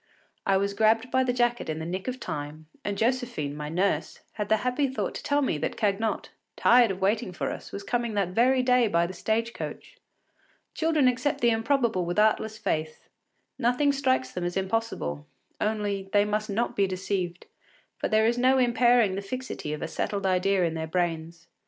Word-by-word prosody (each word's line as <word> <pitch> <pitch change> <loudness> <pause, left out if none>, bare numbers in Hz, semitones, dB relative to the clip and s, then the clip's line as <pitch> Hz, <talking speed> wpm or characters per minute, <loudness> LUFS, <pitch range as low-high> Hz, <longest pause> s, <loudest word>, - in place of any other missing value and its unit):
I 195 -1 +4
was 200 +1 0
grabbed 225 +4 +2
by 260 0 +3
the 255 - +1
jacket 240 -4 0
in 155 - -2
the 160 - -5
nick 185 +5 -4
of 255 0 -3
time, 150 - -6 0.2
and 205 -1 -2
Josephine, 235 - -1
my 150 0 -5
nurse, 185 +5 -1
had 210 -2 -4
the 220 - +4
happy 255 +3 +1
thought 265 - -3
to - - -6
tell 290 0 +1
me 160 - 0
that - - -3
Cagnotte, 215 0 0 0.3
tired 240 -1 +5
of 190 0 -4
waiting 200 0 +1
for 180 - -3
us, - - -8
was 200 - -6
coming 235 +1 -1
that 195 -3 +1
very 250 +6 +3
day 250 -2 +4
by 170 -4 +2
the 180 - -6
stage 225 +5 -1
coach. - - -7 0.8
Children 315 -4 +2
accept 250 +3 0
the 235 0 +4
improbable 225 -4 +1
with 175 +2 -3
artless 220 0 +2
faith; 155 -7 -3 0.5
nothing 250 +4 +3
strikes 260 -2 0
them 180 - -4
as 175 +1 -2
impossible; 190 - -2 0.3
only, 205 -2 -1
they 205 0 +5
must 210 +1 -1
not 225 +4 -1
be 200 -1 +2
deceived, 185 -1 -3 0.5
for - - 0
there 220 0 +3
is 240 +2 +2
no 260 +2 +4
impairing 240 -4 +4
the 195 - -3
fixity 255 - -5
of 150 - -4
a - - -2
settled 200 +4 -3
idea 190 0 +2
in 165 -2 0
their 160 0 -3
brains. 165 -1 -2
210 Hz, 195 wpm, -27 LUFS, 185-245 Hz, 0.8 s, tired